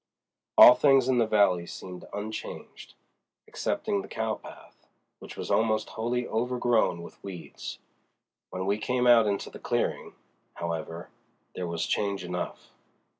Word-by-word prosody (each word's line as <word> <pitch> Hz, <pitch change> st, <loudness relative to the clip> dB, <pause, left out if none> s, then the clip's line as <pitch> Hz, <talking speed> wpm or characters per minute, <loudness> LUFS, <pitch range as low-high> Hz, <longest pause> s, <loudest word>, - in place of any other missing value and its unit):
All 325 Hz, -1 st, +11 dB
things 135 Hz, -, +4 dB
in 130 Hz, -2 st, +3 dB
the 115 Hz, -, +3 dB
valley 95 Hz, -5 st, +3 dB
seemed 90 Hz, 0 st, -9 dB
unchanged, 105 Hz, +2 st, -7 dB, 0.5 s
excepting 100 Hz, -, -2 dB
the -, -, -10 dB
cowpath, 110 Hz, -1 st, -6 dB, 0.3 s
which -, -, -11 dB
was -, -, -5 dB
almost 110 Hz, -1 st, +1 dB
wholly 120 Hz, +2 st, -2 dB
overgrown 115 Hz, -6 st, +1 dB
with -, -, -13 dB
weeds. 95 Hz, -4 st, -8 dB, 0.7 s
When 95 Hz, 0 st, -4 dB
we 100 Hz, +2 st, 0 dB
came 125 Hz, +3 st, 0 dB
out 120 Hz, -3 st, +6 dB
into 100 Hz, -1 st, -2 dB
the -, -, -10 dB
"clearing," -, -, -2 dB, 0.4 s
however, 85 Hz, 0 st, -5 dB, 0.4 s
there 90 Hz, -, -4 dB
was 85 Hz, -1 st, -2 dB
change 100 Hz, -3 st, -1 dB
enough. 90 Hz, 0 st, -5 dB
105 Hz, 130 wpm, -28 LUFS, 90-120 Hz, 0.7 s, All